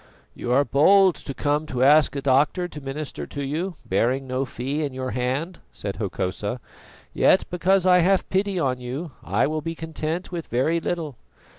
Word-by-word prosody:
"You 120 - -4
are 140 +3 +4
bold 190 +6 +5
who 135 - -6
come 150 +1 0
to 125 0 -1
ask 150 +2 +5
a 140 - -3
doctor 145 +7 +2
to 150 -4 -9
minister 140 +2 -5
to 145 - -5
you, 165 +6 -3
bearing 125 +8 +1
no 130 +1 -2
fee 135 +4 -3
in 140 -3 -4
your 130 -1 -3
hand," 130 - -2
said 100 -1 -6
Hokosa. 100 +3 -3 0.5
"Yet, 190 - +4
because 185 +1 +2
I 180 -1 +6
have 190 +2 +2
pity 195 0 0
on 130 -6 0
you, 135 +7 -5
I 100 +6 +1
will 155 +1 -2
be 165 +2 -4
content 160 +2 -4
with 170 -2 -5
very 155 +8 +1
little. 160 -7 -3
145 Hz, 180 wpm, -24 LUFS, 130-170 Hz, 0.5 s, I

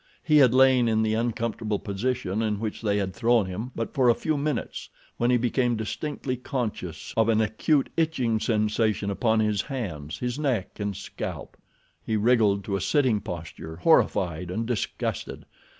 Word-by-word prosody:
He 155 -1 +4
had 130 -5 +7
lain 130 -2 +5
in 110 -1 +2
the 110 0 +1
uncomfortable 115 -2 -1
position 105 0 -2
in 105 -2 -1
which 110 -1 -4
they 105 -2 +1
had 95 -2 -2
thrown 115 -3 +3
him 95 +7 -5
but 115 - -4
for 130 -4 +4
a 120 - +5
few 155 - -1
minutes 145 +1 -3 0.3
when 120 - +1
he 125 - +4
became 120 0 +1
distinctly 130 +4 -3
conscious 110 - -4
of 115 0 +3
an 110 -1 +3
acute 120 +7 +1
itching 130 -9 +1
sensation 105 -2 0
upon 110 +2 +2
his 105 -2 +1
hands, 90 - -5
his 125 +2 -3
neck 130 -12 -1
and 100 -2 -3
scalp. - - -6 0.5
He 110 - -1
wriggled 105 -3 +3
to 100 0 -2
a 100 - -2
sitting 125 +2 +2
posture 80 -2 -7
horrified 85 0 +2
and 110 +6 -2
disgusted. 115 -4 -3
110 Hz, 165 wpm, -26 LUFS, 100-125 Hz, 0.5 s, had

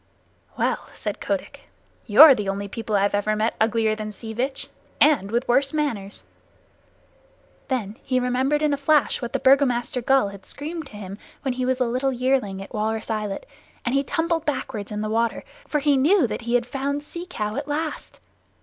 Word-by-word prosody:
"Well!" - - -1
said - - -5
Kotick. - - -4 0.4
"You're 275 +7 +10
the 210 -5 -2
only 200 +1 -3
people 225 +1 -3
I've 200 0 +2
ever 205 +1 +1
met 220 +2 0
uglier 220 0 +2
than 215 0 -5
Sea 220 +2 -8
Vitch 265 +4 -3 0.3
and 270 -10 +4
with 235 +3 -1
worse 270 +3 +2
manners." 225 -10 -2 1.4
Then 225 -5 -2
he 255 -1 0
remembered 260 +4 +1
in 300 -1 +2
a - - 0
flash 290 +1 +2
what 240 - -4
the - - 0
Burgomaster 260 -2 +3
gull 265 -3 +3
had 200 -1 -11
screamed 315 +1 -6
to - - -17
him 200 0 -8 0.2
when 265 -3 0
he 255 0 -2
was 260 0 +1
a 250 - +2
little 255 +3 0
yearling 250 -6 0
at 195 - -14
Walrus 220 0 -2
Islet, 215 - -3 0.4
and 245 - 0
he 275 0 +2
tumbled 330 +1 -1
backward 225 -9 -3
in 210 0 -3
the 215 - -2
water, 230 +1 0 0.2
for 300 - 0
he 290 -1 +3
knew 310 +5 +4
that 235 - -3
he 235 +1 -1
had 245 -1 +2
found 280 +2 -3
Sea 340 +4 -8
Cow 210 -10 -3
at 280 +1 -4
last. 305 +1 -4
250 Hz, 190 wpm, -24 LUFS, 215-280 Hz, 1.4 s, You're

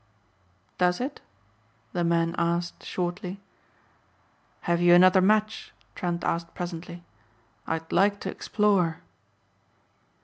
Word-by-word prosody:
"Does 180 -1 +2
it?" 265 +4 -4 0.7
the 175 - 0
man 170 0 +1
asked 170 0 -1
shortly. 180 +1 -4 1.2
"Have 170 0 0
you 175 0 +7
another 185 +1 +6
match?" 215 +2 +1 0.2
Trent 175 -1 -3
asked 170 0 -2
presently. 175 0 -6 0.6
"I'd 160 0 -3
like 200 +2 +3
to - - -3
explore." 195 -6 +1
175 Hz, 100 wpm, -26 LUFS, 170-190 Hz, 1.2 s, you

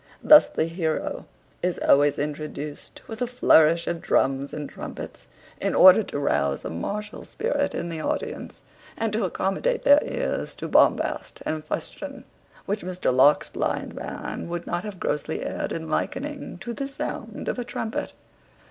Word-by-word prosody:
Thus 300 -1 +8
the 160 - 0
heroe 165 -1 -3 0.3
is 180 0 0
always 145 0 +4
introduced 150 0 -5
with 225 +1 -8
a 245 - +1
flourish 170 -9 +4
of 170 -1 -3
drums 135 +1 +1
and 150 -1 -5
trumpets, - - -8 0.3
in - - 0
order 185 +3 +9
to 190 - -5
rouse 70 - 0
a - - -3
martial 210 - -5
spirit 475 +3 -1
in 170 - -3
the 165 -1 -4
audience, - - -4 0.4
and 225 -1 -1
to 215 -1 +1
accommodate 195 - -1
their 285 +1 +7
ears - - -3
to - - -5
bombast - - +2
and 155 -1 -2
fustian, 275 - -5 0.4
which 205 +2 -2
Mr 180 -8 -1
Locke's 140 +3 +5
blind - - -2
man - - -6
would 175 0 -4
not 175 0 -2
have 205 -4 -7
grossly 150 +1 -2
erred - - -3
in 160 -1 -4
likening 280 - -3
to 240 +2 -4
the 275 +4 -4
sound 275 - -6
of - - -2
a - - -1
trumpet. 225 -2 -4
175 Hz, 160 wpm, -25 LUFS, 150-225 Hz, 0.4 s, order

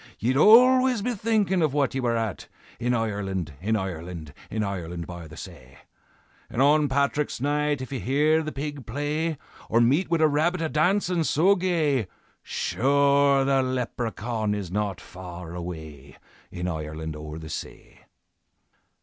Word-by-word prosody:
Ye'd 125 +4 0
always 250 - +6
be 245 - 0
thinkin' 210 -4 +1
of 150 -3 +1
what 140 -2 +1
ye 135 - -1
were 120 -2 +1
at, 110 -5 -3 0.3
In 125 +1 +1
Ireland, 95 -7 -2
in 110 +4 +1
Ireland, 85 -6 -5 0.2
In 110 0 -2
Ireland 90 -4 -4
by 85 -2 -8
the 75 +1 -12
say. 65 -8 -11 0.7
And - - -5
on 145 +1 +4
Patrick's 140 +1 0
Night 145 +1 0
if 130 - -7
ye 135 - -3
hear 150 +6 +2
the 155 -1 -4
pig 145 -2 -6
play, 150 +5 -2 0.3
Or 115 - +3
meet 140 +11 +3
wid 165 -1 +1
a 155 - +6
rabbit 160 +5 +1
a 160 - -1
dancin' 180 +2 +2
so 175 +6 +4
gay, 160 - +1 0.3
Sure 140 +1 +2
the 135 -1 +3
Leprechaun 120 -4 -2
is 95 -4 -5
not 100 -1 -2
far 90 -3 -9
away, 80 -5 -8 0.3
In 90 0 -4
Ireland 80 -1 -4
o'er 75 +1 -7
the 80 -1 -8
say." - - -8
130 Hz, 155 wpm, -25 LUFS, 90-150 Hz, 0.7 s, always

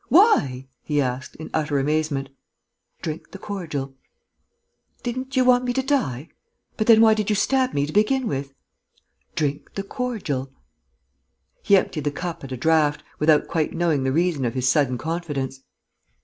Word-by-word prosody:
Why?" 140 - +4
he 150 -1 -1
asked, 130 -1 -2
in 160 - -9
utter 150 -2 0
amazement. 145 -1 0 0.7
"Drink 155 0 -5
the - - -9
cordial." 160 -10 -5 1.1
"Didn't 255 +2 -4
you 255 -1 +4
want 250 0 +5
me 245 -1 -1
to 265 +1 0
die? 165 - -1 0.5
But 215 - -1
then 225 -1 +8
why 220 -1 +7
did 215 -1 -1
you 210 - +2
stab 260 +4 +1
me 140 - +2
to 150 - -7
begin 250 +4 +2
with?" 140 -3 -3 0.8
"Drink 145 -1 -2
the 195 - -2
cordial." 195 - -3 1.1
He 200 - +5
emptied 155 -5 -2
the - - +3
cup 170 +3 -5
at 135 - -8
a 130 - -3
draught, 155 +1 +2 0.2
without 150 -1 +4
quite 160 -2 -1
knowing 165 -5 +1
the 130 - +1
reason 165 -2 +1
of 120 +1 -1
his 130 0 0
sudden 135 -4 +2
confidence. 145 -3 -3
155 Hz, 165 wpm, -23 LUFS, 140-215 Hz, 1.1 s, then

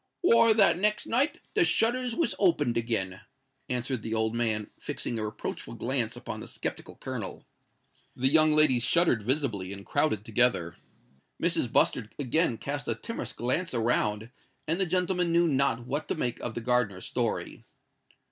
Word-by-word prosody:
"Why, 230 - +5
that 195 -6 +4
next 210 +1 +1
night 265 +7 0
the - - +4
shutters 240 +1 +1
was 335 - +1
opened 150 - +2
again," 110 -5 -1 0.5
answered 125 0 0
the 110 +1 -3
old 110 0 0
man, 110 -3 0
fixing 115 - -4
a 110 - -2
reproachful 105 - -6
glance - - 0
upon - - -7
the - - -9
sceptical - - -5
Colonel. - - -6 0.7
The 130 - +1
young 155 +2 +4
ladies 150 -5 +5
shuddered 150 -2 +2
visibly, 110 -6 -1
and 100 0 -8
crowded 145 -8 0
together;—Mrs. 90 - -1
Bustard 105 - +1
again 145 -1 +1
cast 145 +4 -4
a - - 0
timorous 230 - -5
glance 130 +6 -1
around;—and 115 - -1
the 190 - +1
gentlemen 180 0 +1
knew 170 0 +3
not 135 -5 +1
what 145 +5 -3
to - - -2
make 125 -6 -2
of 120 - -5
the 120 - -4
gardener's 115 -6 0
story. - - -2
130 Hz, 155 wpm, -28 LUFS, 110-170 Hz, 0.7 s, Why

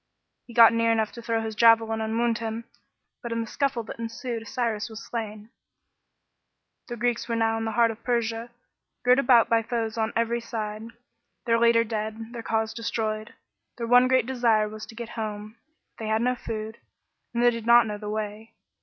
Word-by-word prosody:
He 235 - -12
got 230 -1 +8
near 230 0 +2
enough 220 -1 +1
to 235 - -9
throw 230 -1 -1
his 220 0 -4
javelin 225 0 +4
and 220 +1 -2
wound 235 -1 +1
him, 225 0 -4 0.6
but 235 - -6
in 230 0 -1
the - - -3
scuffle 260 0 -1
that 225 - -9
ensued 230 0 -5
Cyrus 230 -4 -2
was 220 0 -9
slain. 215 -1 -6 1.4
The 240 - -6
Greeks 240 0 -1
were 230 - 0
now 225 0 +1
in 225 - -3
the 225 - -2
heart 230 0 +4
of 225 +1 -12
Persia, 235 -1 -1 0.6
girt 250 +2 +5
about 240 -4 +5
by 230 -1 +3
foes 225 -1 -3
on 220 0 0
every 230 +1 0
side 220 -1 -5 0.6
their 230 -1 +3
leader 235 0 +5
dead, 220 +1 -5
their 235 - -5
cause 220 0 -1
destroyed. 220 -1 -3 0.4
Their 235 - -3
one 245 +2 +6
great 255 -2 +3
desire 235 -4 +2
was 215 0 -8
to 225 - -12
get 235 0 -6
home. 215 -1 -6 0.4
But - - -6
they - - -3
had 220 +1 +1
no 250 +1 +2
food, 220 -2 -6 0.5
and 235 0 0
they 245 - +6
did 230 -1 -6
not 240 0 +7
know 210 -1 -5
the 210 0 -6
way. 215 +1 -5
230 Hz, 200 wpm, -26 LUFS, 220-235 Hz, 1.4 s, got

